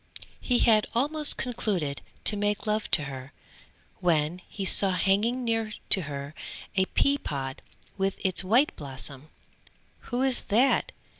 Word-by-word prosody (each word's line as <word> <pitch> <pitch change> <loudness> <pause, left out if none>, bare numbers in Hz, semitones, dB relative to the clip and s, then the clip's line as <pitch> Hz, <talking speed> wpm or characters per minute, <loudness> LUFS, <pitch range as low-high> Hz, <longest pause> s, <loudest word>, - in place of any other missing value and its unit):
He 245 - 0
had 220 -3 +3
almost 295 +5 +4
concluded 185 - -2 0.2
to 210 - +6
make 205 0 -2
love 215 0 -2
to 150 - +6
her, 135 0 -8 0.7
when 165 0 0
he 195 - -5
saw 190 0 +4
hanging 210 +7 +1
near 225 -2 -1 0.2
to 190 - +8
her, 140 +1 -7 0.4
a 190 -1 +2
pea 280 +8 +1
pod 135 - -5 0.4
with 195 0 0
its 185 0 +1
white 235 +10 +2
blossom. 140 0 -8 0.8
"Who 245 +1 -2
is 265 -2 +2
that?" 260 - +2
200 Hz, 140 wpm, -26 LUFS, 150-235 Hz, 0.8 s, to